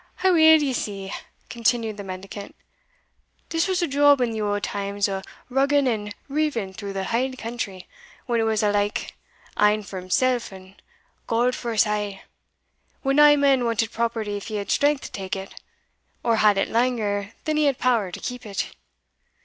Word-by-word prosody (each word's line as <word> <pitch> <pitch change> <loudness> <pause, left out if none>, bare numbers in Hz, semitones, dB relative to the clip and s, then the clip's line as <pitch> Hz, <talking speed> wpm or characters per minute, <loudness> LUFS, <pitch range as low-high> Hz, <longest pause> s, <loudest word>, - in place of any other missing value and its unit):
"Aweel, 320 -4 +6
ye 270 -2 0
see," 195 -4 -4 0.3
continued 230 -1 0
the 205 - -7
mendicant, 195 +2 -8 0.9
"this 330 +1 +1
was 370 -1 0
a - - +1
job 285 0 +5
in 245 -2 +1
the 220 -1 -3
auld 205 -1 -1
times 200 0 -1
o' 195 -1 -3 0.3
rugging 275 +2 +2
and 210 -3 -2
riving 280 -9 -1
through 200 0 -6
the 195 0 -2
hale 255 +6 -1
country, 225 -6 -5 0.4
when 235 -2 0
it 225 - +2
was 220 -1 +1
ilka 205 0 0 0.5
ane 210 +1 +4
for 195 -1 -7
himsell, 245 +7 +1
and 190 0 -14 0.5
God 240 +2 +2
for 235 -2 -4
us 215 - +4
a' 205 -2 -3 0.8
when 275 0 +1
nae 295 0 +8
man 275 -3 +3
wanted 230 -1 0
property 225 -3 -2
if 200 - -8
he 215 - -4
had 200 -1 -3
strength 290 -1 +2
to - - -8
take 190 -1 -4
it, 195 0 -7 0.7
or 230 -1 +2
had 210 -2 +4
it 195 - +1
langer 220 -4 0
than 310 -1 0
he 305 - +3
had 275 -3 +2
power 230 -7 +1
to - - -7
keep 250 -1 -5
it. 200 -2 -4
225 Hz, 175 wpm, -24 LUFS, 205-260 Hz, 0.9 s, nae